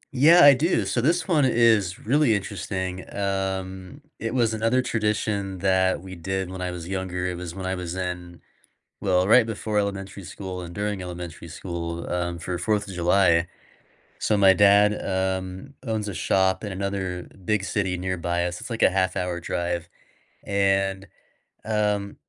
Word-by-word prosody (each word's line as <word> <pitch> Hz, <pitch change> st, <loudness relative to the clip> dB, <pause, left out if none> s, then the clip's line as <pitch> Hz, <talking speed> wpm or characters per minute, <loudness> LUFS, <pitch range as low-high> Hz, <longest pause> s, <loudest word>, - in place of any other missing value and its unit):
Yeah, 165 Hz, +7 st, +7 dB
I 145 Hz, -1 st, +10 dB
do, 135 Hz, -, +1 dB
so 100 Hz, +5 st, 0 dB
this 170 Hz, +8 st, +1 dB
one 155 Hz, -6 st, +3 dB
is 115 Hz, -7 st, +3 dB
really 135 Hz, -1 st, +3 dB
interesting, 95 Hz, -2 st, -4 dB
um, 95 Hz, +2 st, -3 dB, 0.2 s
it 115 Hz, +2 st, -3 dB
was 115 Hz, -3 st, +2 dB
another 115 Hz, +4 st, +1 dB
tradition 105 Hz, -4 st, -1 dB
that 95 Hz, -1 st, +2 dB
we 95 Hz, -1 st, -9 dB
did 95 Hz, +2 st, -3 dB
when 95 Hz, -, -6 dB
I 90 Hz, -, -2 dB
was 90 Hz, -1 st, -6 dB
younger, 95 Hz, -1 st, -3 dB
it 90 Hz, -, -2 dB
was 85 Hz, -1 st, -7 dB
when 95 Hz, -1 st, -5 dB
I 95 Hz, -, -1 dB
was 90 Hz, -1 st, -4 dB
in 90 Hz, -1 st, -5 dB, 0.6 s
well, 90 Hz, -2 st, +2 dB
right 115 Hz, +2 st, +6 dB
before 110 Hz, -1 st, -3 dB
elementary 100 Hz, -1 st, -4 dB
school 95 Hz, 0 st, -6 dB
and 85 Hz, -1 st, -8 dB
during 105 Hz, 0 st, -2 dB
elementary 90 Hz, -2 st, -7 dB
school, 85 Hz, 0 st, -5 dB
um, 85 Hz, -1 st, -2 dB
for 90 Hz, +1 st, -3 dB
4th 105 Hz, +4 st, 0 dB
of 100 Hz, -, -7 dB
July, 85 Hz, -1 st, +3 dB, 0.7 s
so 105 Hz, -, +1 dB
my 95 Hz, -1 st, +7 dB
dad, 100 Hz, +1 st, +5 dB
um, 95 Hz, +5 st, -2 dB
owns 110 Hz, -4 st, -2 dB
a 105 Hz, -, -4 dB
shop 95 Hz, +2 st, +1 dB
in 105 Hz, -, -4 dB
another 95 Hz, -2 st, -3 dB, 0.2 s
big 105 Hz, +1 st, 0 dB
city 95 Hz, -3 st, -1 dB
nearby 85 Hz, -1 st, -1 dB
us, 90 Hz, 0 st, -4 dB
it's -, -, -7 dB
like 115 Hz, -1 st, -1 dB
a -, -, +6 dB
half 95 Hz, 0 st, +1 dB
hour 90 Hz, -1 st, -2 dB
drive, 85 Hz, 0 st, -3 dB, 0.5 s
and, 95 Hz, -1 st, +1 dB, 0.6 s
um, 105 Hz, -2 st, 0 dB
95 Hz, 165 wpm, -25 LUFS, 90-105 Hz, 0.7 s, I